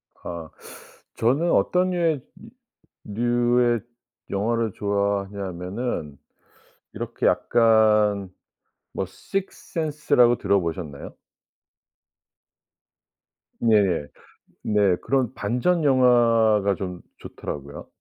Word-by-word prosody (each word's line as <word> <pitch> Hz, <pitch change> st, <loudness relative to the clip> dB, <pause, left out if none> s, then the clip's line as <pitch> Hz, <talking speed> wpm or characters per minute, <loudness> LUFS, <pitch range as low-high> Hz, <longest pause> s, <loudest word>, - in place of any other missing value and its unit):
아 85 Hz, -2 st, -8 dB, 0.7 s
저는 140 Hz, +9 st, +1 dB
어떤 180 Hz, +1 st, +2 dB
류의 165 Hz, -5 st, 0 dB, 0.8 s
류 105 Hz, +2 st, -6 dB, 0.3 s
류의 120 Hz, -1 st, +3 dB, 0.5 s
영화를 110 Hz, +2 st, -1 dB
좋아하냐면은 100 Hz, -, -3 dB, 0.8 s
이렇게 -, -, -4 dB
약간 105 Hz, -3 st, +3 dB, 0.6 s
뭐 95 Hz, -, -3 dB
식스센스라고 150 Hz, -, 0 dB
들어보셨나요? 85 Hz, -7 st, -2 dB, 2.5 s
네네. 100 Hz, -9 st, +2 dB, 0.6 s
네. 100 Hz, -4 st, +2 dB
그런 130 Hz, -4 st, 0 dB
반전 125 Hz, +11 st, 0 dB
영화가 115 Hz, -6 st, +4 dB
좀 90 Hz, -2 st, -6 dB, 0.2 s
좋더라고요. 70 Hz, 0 st, -8 dB
105 Hz, 175 characters per minute, -24 LUFS, 95-125 Hz, 2.5 s, 영화가